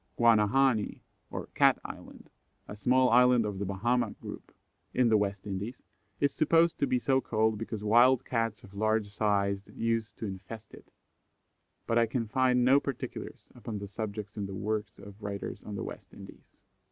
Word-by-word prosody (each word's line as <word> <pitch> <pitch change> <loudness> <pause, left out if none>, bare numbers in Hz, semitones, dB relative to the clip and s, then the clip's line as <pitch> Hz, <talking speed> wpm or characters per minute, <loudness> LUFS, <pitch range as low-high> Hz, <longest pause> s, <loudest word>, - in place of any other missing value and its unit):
Guanahani, 115 +1 +3 0.3
or - - -5
Cat - - +5
Island, - - -10 0.4
a 105 - -7
small 125 +4 +3
island 125 -1 +5
of 100 -2 -4
the 100 - -2
Bahama 120 +6 0
group, - - -9 0.4
in 125 -2 +4
the 110 - +4
West 100 -1 0
Indies, 105 +5 -5 0.4
is 140 -1 +2
supposed 165 +2 +3
to 140 - +2
be 130 -1 +2
so 130 +1 +2
called 110 -2 0
because 110 -2 -5
wild 120 +4 +5
Cats 115 -3 -2
of 100 - -14
large 110 +1 0
size 100 -1 0
used 115 -2 -2
to - - -5
infest 100 +3 -8
it, - - -14 1.0
but 115 0 +2
I 115 - +3
can 115 0 -2
find 125 +1 +2
no 135 +2 +6
particulars 140 -3 -6
upon 115 -2 -6
the 100 0 -6
subject 105 0 -6
in 100 -2 -3
the 95 - -6
works 105 +1 -3
of 100 +1 -13
writers 100 -1 -5
on 105 - -6
the - - -4
West - - -9
Indies. - - -14
110 Hz, 175 wpm, -30 LUFS, 100-125 Hz, 1.0 s, no